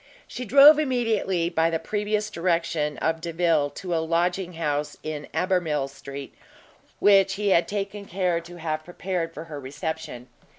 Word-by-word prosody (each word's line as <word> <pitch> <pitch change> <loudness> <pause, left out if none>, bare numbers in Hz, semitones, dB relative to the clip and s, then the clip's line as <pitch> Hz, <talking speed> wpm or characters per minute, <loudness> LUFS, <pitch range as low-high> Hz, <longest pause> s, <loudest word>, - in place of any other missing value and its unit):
She 250 - -6
drove 285 +5 +8
immediately, 225 - 0
by 165 -1 +1
the 165 - 0
previous 210 +3 -2
direction 165 -4 0
of 160 0 -1
Delvile, 165 -3 +1
to 180 -3 -4
a 165 - +1
lodging 175 +2 0
house 150 -3 -2
in 150 -2 -5
Albemarle 165 -7 0
Street, 140 0 -9 0.7
which 195 -1 +5
he 205 0 0
had 175 -3 +4
taken 200 0 -4
care 180 -2 0
to 170 +1 -12
have 155 -2 -3
prepared 175 -1 -3
for 165 - -8
her 155 -3 -8
reception. 145 -1 -6
170 Hz, 155 wpm, -25 LUFS, 160-195 Hz, 0.7 s, drove